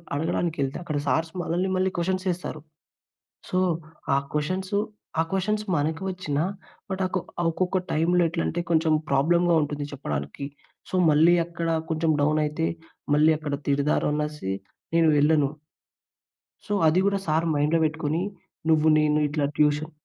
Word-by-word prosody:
అడగడానికెళ్తే 150 -2 -1
అక్కడ 155 -3 -3
సార్స్ 160 +3 +1
మనల్ని 175 +2 -1
మళ్ళీ 185 0 +1
క్వశ్చన్స్ 185 +2 -1
ఏస్తారు. 170 -3 -5 0.9
సో, 185 - +1 0.6
ఆ - - +4 0.2
క్వశ్చన్స్ 185 +6 -2 0.5
ఆ - - +5
క్వశ్చన్స్ 210 +3 0
మనకి 155 +4 -1
వచ్చిన 180 -6 -3 0.5
బట్ 190 0 -2
ఆహ్, 185 - -7
కొ - - +2 0.3
ఒక్కొక్క 185 +3 0
టైమ్‌లో 175 +3 +3
ఎట్లంటే 170 +1 -2
కొంచెం 160 -1 +3 0.2
ప్రాబ్లమ్‌గా 170 +5 +3
ఉంటుంది 145 0 -3
చెప్పడానికి. 75 - -4 0.4
సో, - - -7 0.2
మళ్ళీ 160 +4 +5
అక్కడ 170 -1 -4 0.2
కొంచెం 160 0 +1
డౌన్ 155 +1 +2
అయితే, 155 +2 -1 0.5
మళ్ళీ 155 +2 +5
అక్కడ 150 -2 -3
తిడతారనేసి 150 -3 0 0.4
నేను 165 -1 +5
వెళ్ళను. 150 -1 +4 1.2
సో, 205 - -2
అది 160 +4 +4
కూడా 200 0 +2
సర్ 160 +2 +1
మైండ్‌లో 150 +3 +2
పెట్టుకొని, 155 +2 -1 0.5
నువ్వు 160 -1 +4
నేను 150 0 +3
ఇట్లా 145 0 0
ట్యూషన్ 150 +1 +2
160 Hz, 135 wpm, -25 LUFS, 150-175 Hz, 1.2 s, ఆ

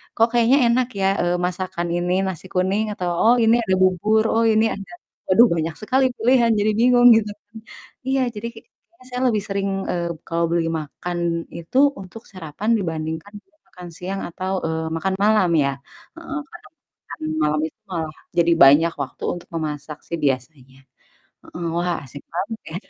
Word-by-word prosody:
"Kok 225 0 +4
kayaknya 240 +3 +4
enak 245 +1 +2
ya, 190 - +3
eee, 175 0 +1
masakan 180 -1 -3
ini? 175 +1 0
Nasi 185 -1 -6
kuning," 190 +4 +1
atau, 180 -3 -3
"Oh, 235 +2 +6
ini 225 +1 +5
ada 190 - +1
bubur, 210 +4 +3
oh, 230 0 +2
ini 220 +1 +3
ada" 200 - -10 0.4
waduh, 230 +6 +7
banyak 160 0 -2
sekali 260 +5 +2
pilihan 240 -1 +3
jadi 215 +1 +2
bingung 245 0 +6
gitu 210 -2 -1
kan. 205 +2 -16 0.5
Iya 270 0 +1
jadi 220 +3 -4
kayaknya 340 - -20
saya 250 0 -4
lebih 215 -4 +1
sering, 200 0 -2 0.2
eee, 175 -1 -2 0.2
kalau 170 0 0
beli 170 -1 +1
makan 175 +4 -6 0.4
itu 170 +9 -5 0.2
untuk 190 +4 -11
sarapan 185 +4 -5
dibandingkan 160 +1 -4
dia 315 -5 -39
makan 180 -1 -11
siang 190 +2 -4
atau, 185 +3 -4
eee, 160 0 -2
makan 190 +3 -1
malam 210 -4 +4
ya, 140 - +1 0.5
heeh, 325 -3 -5
karena 345 +4 -13 0.4
makan 145 - -9 0.2
malam 150 0 +1
itu - - -17
malah 160 -3 -3 0.2
jadi 170 0 +4
banyak 155 +5 +6
waktu - - -10
untuk 175 - -10
memasak 150 -1 -4
sih 170 - -3
biasanya, 130 0 -3 0.7
heeh, 175 - -8
wah 175 +1 0
asik 140 +2 -11
banget 210 +5 -4
ya. 165 - -5
185 Hz, 170 wpm, -22 LUFS, 165-225 Hz, 0.7 s, waduh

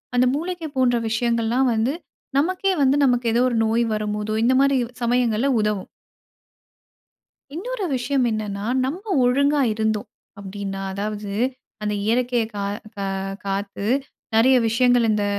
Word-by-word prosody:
அந்த 250 +1 +4
மூலிகை 340 +1 -4
போன்ற 250 -2 +3
விஷயங்கள்லாம் 235 +2 +1
வந்து 225 +6 +1 0.4
நமக்கே 370 +6 +1
வந்து 270 0 +4
நமக்கு 245 -1 +2
ஏதோ 240 - +3
ஒரு 240 - -1
நோய் 225 +2 +2
வரும்போதோ 210 0 -2
இந்த 255 +2 +4
மாரி 275 -1 +3 0.2
சமயங்கள்ல 240 0 +1
உதவும். 210 -3 -1 1.7
இன்னொரு 440 +4 -4
விஷயம் 255 +1 0
என்னன்னா, 205 -2 -3 0.2
நம்ப 355 +10 -5 0.2
ஒழுங்கா 280 +3 +3
இருந்தோம் 220 -1 -1 0.3
அப்படின்னா 195 0 -5
அதாவது 205 +1 -4 0.5
அந்த 210 0 -1
இயற்கையை 240 0 +1
க - - -6 0.4
கா 200 -1 -3 0.4
காத்து 200 0 -3 0.5
நெறைய 255 +4 +5
விஷயங்கள் 245 +1 +3
இந்த 210 -1 +1
235 Hz, 125 wpm, -22 LUFS, 210-260 Hz, 1.7 s, நெறைய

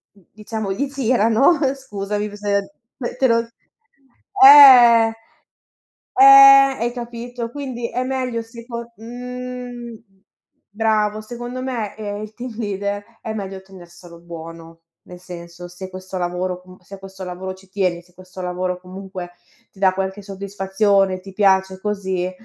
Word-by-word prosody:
d 195 - -24
diciamo 215 -1 -5
gli 275 +9 -2
girano 255 +2 +2 0.2
scusami, 210 -5 -5
s - - -13
se 210 +5 -4
te 260 - +3
lo 230 0 +1 1.0
eh. 245 -5 +9 1.0
Eh 395 - +6 0.6
hai 240 +1 -1
capito? 240 0 -6
Quindi 250 -3 -5
è 250 - -2
meglio 255 -3 -3
seco 235 0 -9
mhmm, 245 0 -8 0.7
bravo, 215 0 0
secondo 240 +3 -7
me 235 -6 -4
eh 205 -1 -5
il 215 0 -9
team 245 -2 -8
leader 205 -1 -3 0.2
è 220 - -6
meglio 195 -2 -6
tenerselo 175 -2 -15
buono. 165 -1 -11 0.2
Nel 180 0 -12
senso, 175 -1 -10
se 180 +2 -9
questo 185 0 -8
lavoro, 180 +1 -3
mhmm, 185 0 -15
se 195 +2 -13
questo 190 0 -10
lavoro 185 +1 -6
ci 195 +1 -20
tieni, 185 -3 -2
se 180 0 -27
questo 185 0 -12
lavoro 180 0 -3
comunque 185 -1 -9 0.4
ti 195 - -20
dà 190 -1 +4
qualche 190 +1 -4
soddisfazione, 195 0 0
ti 195 +1 -13
piace, 190 -1 +2
così, 190 -3 -2
205 Hz, 135 wpm, -20 LUFS, 185-235 Hz, 1.0 s, eh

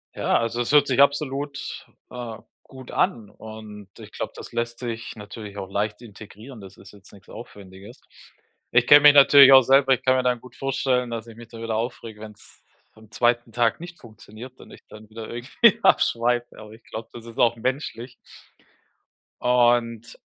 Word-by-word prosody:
Ja, - - 0
also 115 +1 -3
es 120 - -3
hört 145 -1 +5
sich 130 0 -1
absolut, 140 0 -1 0.2
äh, 120 -3 -8 0.3
gut 130 -1 -13
an 115 - -1
und 105 -2 -12
ich - - -13
glaube, - - -6
das - - -11
lässt 120 0 -4
sich 115 -2 -6
natürlich 105 -1 -10
auch 95 -1 -7
leicht 105 +2 -3
integrieren. 110 +2 -13
Das 95 - -13
ist - - -16
jetzt 100 -1 -18
nix 95 -3 -19
Aufwendiges. 100 +4 -13 0.7
Ich 120 0 +2
kenne 145 0 +8
mich 145 -1 +8
natürlich 140 -1 +8
auch 130 - +9
selber 135 +1 +4
ich 125 - -3
kann 130 0 +3
mir 130 - 0
dann 125 -1 0
gut 125 -1 -16
vorstellen, 130 -2 -1
dass 115 0 -6
ich 115 - -13
mich 120 -1 -13
da 115 -1 -11
wieder 115 -1 -3
aufrege, 115 -1 -6
wenn's 105 -1 -13 0.3
am 110 -1 -19
2. 120 0 0
Tag 120 +1 0
nicht 175 -1 -11
funktioniert 115 +2 -14
und - - -16
ich - - -15
dann 110 0 -14
wieder 110 0 -9
irgendwie 130 - +2
abschweife, 120 +1 +1
aber 110 -1 -12
ich 110 +1 -16
glaube, 110 0 -9
das 115 -1 -11
ist 115 - -13
auch 120 0 +2
menschlich. 125 0 -5 1.3
Und 120 -2 +1
120 Hz, 185 wpm, -23 LUFS, 110-130 Hz, 1.3 s, auch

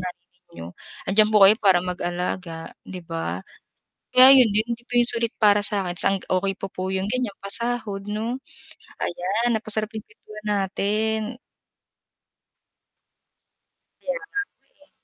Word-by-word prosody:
nanay 180 -1 -7 0.3
niyo, 85 +1 -8 0.3
'andiyan 215 +2 +3
po 210 -2 +6
kayo 195 - +8
para 185 -3 +4
mag-alaga, 175 -1 -4 0.2
'di 180 -2 -8
ba. 130 - -4 0.6
Kaya 255 +1 +8
ayun 255 -4 +7
din 210 +2 +1
hindi 240 +1 -9
po 245 - -3
yung 240 0 +4
sulit 230 0 -1
para 210 -1 +4
sa'kin, 200 -3 0
tas 180 - 0
ang 195 0 +1
okay 195 +1 -1
pa - - -5
po 185 0 -4
yung 190 0 -2
ganyan 250 -5 -2
pasahod 210 -2 -1
no. 225 +5 -3 0.6
Ayan 200 +7 -1
napasarap 215 0 -1
yung 220 - -6
kuwentuhan 215 0 -13
natin. 210 +2 0 2.8
Kaya - - -3
nga 410 - -12 0.5
po, - - -41
eh. - - -37
205 Hz, 145 wpm, -23 LUFS, 185-225 Hz, 2.8 s, kayo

